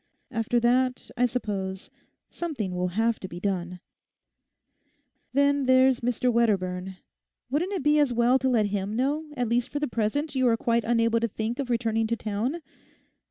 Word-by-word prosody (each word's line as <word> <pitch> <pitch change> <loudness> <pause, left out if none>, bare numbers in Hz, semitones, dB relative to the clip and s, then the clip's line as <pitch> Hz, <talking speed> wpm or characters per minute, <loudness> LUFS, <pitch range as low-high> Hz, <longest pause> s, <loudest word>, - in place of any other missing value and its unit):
After 230 0 0
that, 255 +2 +1
I 250 -1 +3
suppose, 195 -6 -4 0.4
something 270 - -4
will 180 0 -1
have 230 0 +2
to 190 - -6
be 175 -1 -8
done. 180 -2 -3 1.5
Then 280 0 +2
there's 260 -1 +5
Mr 245 +1 0
Wedderburn; 190 -5 0 0.5
wouldn't 350 +8 0
it 365 -8 -2
be 295 +1 +4
as 290 -4 +3
well 240 +2 +3
to 265 - +1
let 230 -4 +3
him 205 +1 -2
know 285 +6 0
that 295 - -14
at 245 - +1
least 240 +1 +1
for - - -4
the 295 - -1
present 245 +7 -1
you 260 -2 +2
are 230 -1 +3
quite 235 0 +1
unable 230 0 +2
to 230 - 0
think 225 +3 -4
of 270 -3 -3
returning 225 -2 0
to 230 - 0
town? 230 +10 -3
235 Hz, 175 wpm, -26 LUFS, 215-260 Hz, 1.5 s, there's